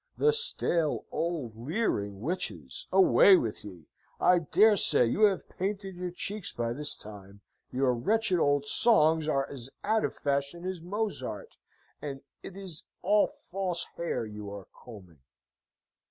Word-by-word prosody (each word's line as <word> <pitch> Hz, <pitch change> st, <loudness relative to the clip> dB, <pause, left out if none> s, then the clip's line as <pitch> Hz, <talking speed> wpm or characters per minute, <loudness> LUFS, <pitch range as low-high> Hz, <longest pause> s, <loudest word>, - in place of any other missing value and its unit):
The 450 Hz, 0 st, +3 dB
stale, 175 Hz, -, +1 dB
old, 160 Hz, -10 st, -3 dB
leering 115 Hz, -, -2 dB
witches! 110 Hz, -, -4 dB
Away 190 Hz, +1 st, +7 dB
with 115 Hz, -8 st, -3 dB
ye! 90 Hz, -6 st, -11 dB, 0.3 s
I 180 Hz, -1 st, +5 dB
dare 205 Hz, +7 st, +4 dB
say 125 Hz, -, +4 dB
you 205 Hz, -, +3 dB
have 200 Hz, -3 st, 0 dB
painted 195 Hz, 0 st, -4 dB
your 180 Hz, 0 st, -4 dB
cheeks 195 Hz, +3 st, -4 dB
by 115 Hz, 0 st, -2 dB
this 145 Hz, +3 st, -2 dB
time; 100 Hz, -1 st, -12 dB, 0.3 s
your 130 Hz, 0 st, +1 dB
wretched 200 Hz, -, +1 dB
old 145 Hz, -2 st, +2 dB
songs 160 Hz, -4 st, +3 dB
are 135 Hz, -3 st, 0 dB
as 130 Hz, -2 st, -7 dB
out 220 Hz, +1 st, +1 dB
of -, -, -2 dB
fashion 140 Hz, +5 st, -2 dB
as 185 Hz, -2 st, -4 dB
Mozart, 210 Hz, -, -4 dB, 0.5 s
and 135 Hz, -2 st, -6 dB, 0.2 s
it 195 Hz, -, -10 dB
is 185 Hz, -6 st, -5 dB, 0.2 s
all 205 Hz, +3 st, +4 dB
false 190 Hz, -, -3 dB
hair 170 Hz, -8 st, -2 dB
you 105 Hz, -1 st, -8 dB
are 100 Hz, -1 st, -9 dB
combing! 95 Hz, -, -14 dB
160 Hz, 145 wpm, -29 LUFS, 120-195 Hz, 0.5 s, Away